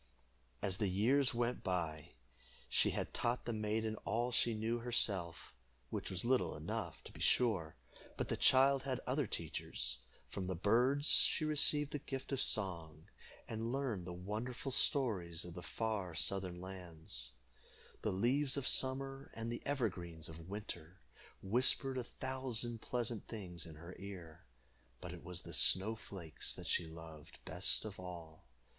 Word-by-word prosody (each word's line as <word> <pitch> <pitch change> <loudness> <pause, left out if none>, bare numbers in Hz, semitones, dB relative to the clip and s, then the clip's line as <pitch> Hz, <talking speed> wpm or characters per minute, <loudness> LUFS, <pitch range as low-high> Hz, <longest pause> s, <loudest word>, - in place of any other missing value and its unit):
As 95 0 0
the 105 - +2
years 120 +9 +4
went 120 +1 0
by, 80 -5 -2 0.5
she - - +4
had - - -3
taught 120 +1 0
the 120 - -1
maiden 110 0 -1
all 120 +4 -1
she 120 -1 +3
knew 115 +2 0
herself, 100 -8 0 0.4
which - - -3
was 95 +3 -1
little 120 -9 +2
enough, 75 - -4
to - - -10
be - - -12
sure; 95 -11 +2 0.4
but - - -1
the - - 0
child 135 +1 +6
had 130 -2 -2
other 135 0 +1
teachers. 60 -8 -3 0.3
From 95 - -4
the 95 - -1
birds 125 - +3
she 155 - +7
received 150 -1 +4
the 145 - -2
gift 135 -1 -5
of 135 -1 +2
song, 85 -6 -1 0.4
and 115 +1 -3
learned 125 -10 -1
the - - -4
wonderful 110 +9 -4
stories 95 - +1
of 90 - -7
the 90 - -6
far 100 -5 -2
southern 95 -1 0
lands. 80 -10 -8 0.7
The - - 0
leaves 130 +8 +2
of 140 - -1
summer, 135 +1 0
and 115 +1 -3
the 120 - -4
evergreens 90 - -2
of 80 +2 -10
winter, 95 -4 -7 0.4
whispered 130 +5 +3
a - - -2
thousand 120 -3 -1
pleasant 120 -3 -2
things 90 -6 -5
in 80 - -10
her 85 +4 -9
ear, 90 -5 -9 0.5
but - - -6
it - - -9
was - - -4
the - - -8
snow 105 +4 +5
flakes 90 -7 -4
that - - -8
she 85 - +1
loved 80 -2 -10
best - - +2
of 105 -3 -7
all. 85 -3 -8
105 Hz, 155 wpm, -37 LUFS, 85-125 Hz, 0.7 s, she